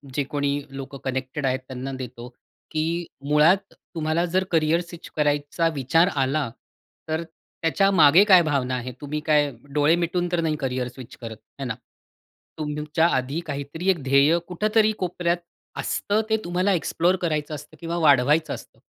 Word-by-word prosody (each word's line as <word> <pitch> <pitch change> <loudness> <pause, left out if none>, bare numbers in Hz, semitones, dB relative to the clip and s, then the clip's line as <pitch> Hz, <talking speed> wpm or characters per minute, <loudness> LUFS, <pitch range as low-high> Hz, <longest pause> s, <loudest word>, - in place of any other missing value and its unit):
जे 145 - +1
कोणी 145 0 -1
लोकं 135 0 -8
कनेक्टेड 130 +2 -3
आहेत 130 0 +1
त्यांना 130 +1 -5
देतो. 125 -1 -7 0.4
की 155 - 0 0.5
मुळात 170 +7 +4
तुम्हाला 160 +1 -2
जर 185 0 +3
करियर 165 +1 +3
स्विच 170 -1 -11
करायचा 145 +2 +1
विचार 145 +6 +3
आला, 135 0 0 0.6
तर 160 +2 -1
त्याच्या 165 +3 -1
मागे 165 +1 +7
काय 190 -4 +7
भावना 135 -4 0
आहे? 125 0 -4
तुम्ही 145 +1 -3
काय 150 -2 +3 0.2
डोळे 150 +3 +4
मिटून 175 +1 -1
तर 175 - +1
नाही 160 -2 0
करियर 130 -2 -2
स्विच 125 0 -11
करत, 115 -2 -7 0.2
आहे 135 - -3
ना? 110 - -3 0.8
तुमच्या 150 +2 0
आधी 130 +5 -1
काहीतरी 145 +5 -3
एक 175 -6 +2
ध्येय 140 +5 +4
कुठेतरी 215 +4 +2
कोपऱ्यात 175 -1 0 0.4
असतं, 210 +2 0
ते 220 - +3
तुम्हाला 185 +3 +1
एक्सप्लोर 175 +1 +1
करायचं 155 -3 -1
असतं 150 +2 -12
किंवा 170 0 -3
वाढवायचं 150 0 +4
असतं. - - -11
155 Hz, 155 wpm, -24 LUFS, 140-170 Hz, 0.8 s, मागे